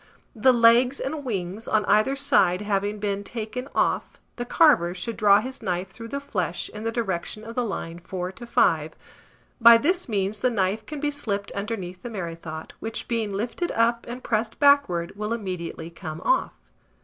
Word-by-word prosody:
The 245 +4 +5
legs 240 +2 +5
and 290 +2 -3
wings 200 -2 -4
on 215 -1 +2
either 215 +6 +3
side 210 -10 +3
having 205 0 -1
been 200 -1 -2
taken 230 +5 -5
off, - - 0 0.2
the 240 - -4
carver 245 - +4
should 215 +5 -4
draw 205 -1 +5
his 260 +3 -7
knife 185 -2 -2
through 230 +3 -9
the 280 +4 -3
flesh 185 - -3
in 210 0 -8
the 225 - -1
direction 215 -2 -3
of 225 +1 -8
the 250 0 0
line 170 -6 -5
4 180 +1 -5
to 235 +5 -11
5: - - +2 0.7
by 230 0 +10
this 350 +5 0
means 205 0 -1
the 250 - +2
knife 205 -1 -1
can 300 -1 -5
be 295 0 0
slipped 205 -9 -3
underneath 200 -4 -5
the 240 - -6
merrythought, 165 -6 -6
which, 225 0 -5
being 225 -3 -1
lifted 235 - -2
up 235 +1 +1
and 245 +2 -7
pressed 220 0 -1
backward, 280 -13 +4
will 210 +2 -2
immediately 180 -6 -5
come 160 -2 -7
off. - - +1
215 Hz, 180 wpm, -25 LUFS, 190-240 Hz, 0.7 s, by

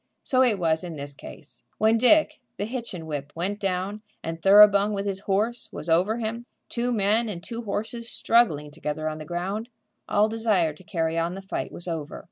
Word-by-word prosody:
So 255 -1 +2
it 240 -5 +4
was 165 -2 +1
in 170 -2 -6
this 140 -1 -6
case. 145 +1 -11
When 220 +1 +3
Dick, 310 +5 +4 0.2
the 205 - -2
Hitchin 230 -8 -5
whip, 145 -2 -5
went 190 +5 -2
down, 195 +2 -2 0.2
and 165 0 -5
Thoroughbung, 205 +1 +7
with 200 0 -3
his 195 -1 -2
horse, 215 +4 -1
was 165 - -6
over 185 +7 +3
him, 230 +1 -4 0.2
two 245 +1 -1
men 220 +1 +2
and 175 -4 -6
two 235 0 -5
horses 225 +3 -3
struggling 155 -11 +2
together 155 0 -4
on 155 0 -3
the 155 - -7
ground, 190 - -3 0.4
all 210 +1 +4
desire 215 -8 +1
to 150 - -17
carry 165 -4 -1
on 170 +2 -1
the 195 - -7
fight 195 - -4
was 175 - -7
over. 160 -3 -4
195 Hz, 195 wpm, -25 LUFS, 165-220 Hz, 0.4 s, Thoroughbung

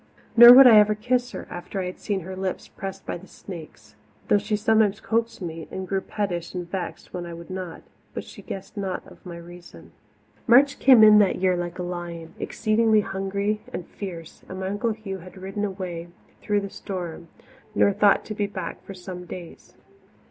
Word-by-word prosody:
Nor 240 +1 +12
would 265 +2 +10
I 225 -4 +9
ever 210 0 +4
kiss 245 +3 0
her, - - -6
after 175 +3 -6
I 185 - -2
had 180 - -6
seen 200 -2 -2
her 185 +2 -7
lips 190 0 -4
pressed 195 0 -8
by - - -4
the 190 - -15
snake's, 160 - -11 0.4
though 205 - +5
she 210 +1 -1
sometimes 215 -1 +2
coaxed 230 -2 -1
me, 165 -1 -6
and 190 0 -6
grew 195 0 -1
pettish 180 -5 -4
and 175 -1 -4
vexed 180 -1 -6
when 175 -1 -5
I 170 - -7
would 170 +2 -11
not; 185 -3 -6 0.3
but - - -4
she - - -12
guessed 195 +2 -8
not 195 -3 -6
my 175 -2 -8
reason. 175 +1 -13 0.6
March 270 +4 +5
came 255 -5 +7
in 210 -1 +9
that 200 -3 +3
year 185 0 +1
like 175 0 -4
a 180 - -3
lion, 175 -2 -6
exceedingly 220 -1 +2
hungry 200 +2 -2
and 175 - -5
fierce, 170 -5 -8
and 185 - -6
my 190 - -2
Uncle 210 +3 -1
Hugh 200 -3 -7
had 185 +2 -13
ridden 195 +2 -5
away 185 -4 -4 0.3
through 205 -1 0
the 200 -1 -6
storm 175 -4 -6 0.5
nor 200 - +4
thought 205 0 +3
to 215 - -5
be 205 -1 -1
back 185 -4 -6
for 195 - -9
some 180 -1 -8
days. 175 -1 -10
190 Hz, 195 wpm, -24 LUFS, 175-210 Hz, 0.6 s, Nor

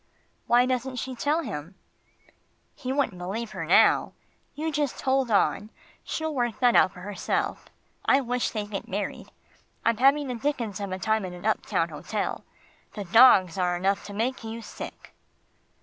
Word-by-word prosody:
"Why 245 +1 +5
doesn't 255 0 -2
she 260 +1 -4
tell 295 +6 0
him?" 150 - -6 1.0
"He 255 - -5
wouldn't 265 -9 0
believe 210 +6 -4
her - - -5
now. - - +4 0.4
You 315 +2 -2
just 290 -3 -1
hold 265 -2 +2
on, 210 0 +2 0.3
she'll 315 -1 -3
work 240 -4 -1
that 245 -2 +4
out 185 - +5
for 180 - -12
herself 205 +1 -2 0.4
I 270 - +4
wish 245 -1 -1
they'd 210 -2 -5
get 195 - -4
married. 200 +2 -4 0.5
I'm 230 -1 +3
having 275 +3 +4
the 250 - -2
dickens 235 -5 -2
of 200 -2 -4
a 185 - -2
time 220 +2 0
in 185 -1 -5
an 180 +2 -10
uptown 220 - 0
hotel. - - -4 0.5
The 205 - -4
dogs 195 -3 +6
are 180 -1 +1
enough 195 +2 0
to 205 - -8
make 240 +4 -1
you 225 +1 -6
sick." - - -9
230 Hz, 165 wpm, -26 LUFS, 200-260 Hz, 1.0 s, dogs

